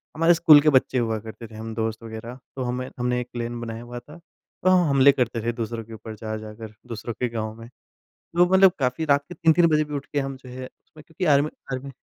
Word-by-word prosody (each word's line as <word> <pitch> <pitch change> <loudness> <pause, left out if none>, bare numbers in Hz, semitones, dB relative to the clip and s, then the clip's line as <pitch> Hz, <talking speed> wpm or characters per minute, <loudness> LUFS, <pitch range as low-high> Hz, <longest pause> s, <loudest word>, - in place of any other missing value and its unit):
हमारे 165 +2 +5
स्कूल 160 -3 +7
के 155 - +4
बच्चे 130 - -5
हुआ 115 -3 0
करते 115 +1 -9
थे 110 - -14
हम 110 +1 -6
दोस्त 110 0 -3
वग़ैरह। 115 +3 -8 0.2
तो 130 - -3
हमें 125 +1 -3
हमने 125 0 0
एक 125 - -7
क्लैन 120 0 -4
बनाया 115 0 -6
हुआ 120 0 -7
था 150 +6 -14
तो 175 +2 -5
हम 180 -3 +4
हमले 140 0 +6
करते 120 -4 -1
थे 120 - 0
दूसरों 115 0 -4
के 115 +1 -12
ऊपर 110 0 -9
जा 110 0 -3
जाकर 110 0 -9
दूसरों 115 0 -5
के 125 +2 -2
गाँव 110 -2 -4
में। 115 0 -11 0.5
तो 175 +1 +1
मतलब 190 0 +7
काफ़ी 130 +4 0
रात 140 -1 +3
के - - -7
3-3 170 0 +4
बजे 155 -1 +3
भी 150 0 -9
उठ 140 - -4
के 145 - +2
हम 135 -1 -3
जो 130 -1 -14
है 130 +1 -7
उसमें 155 +4 -17
क्योंकि 170 +3 -4
आर्मी 145 +2 +3 0.2
आर्मी 130 +2 -5
125 Hz, 245 wpm, -24 LUFS, 115-150 Hz, 0.5 s, स्कूल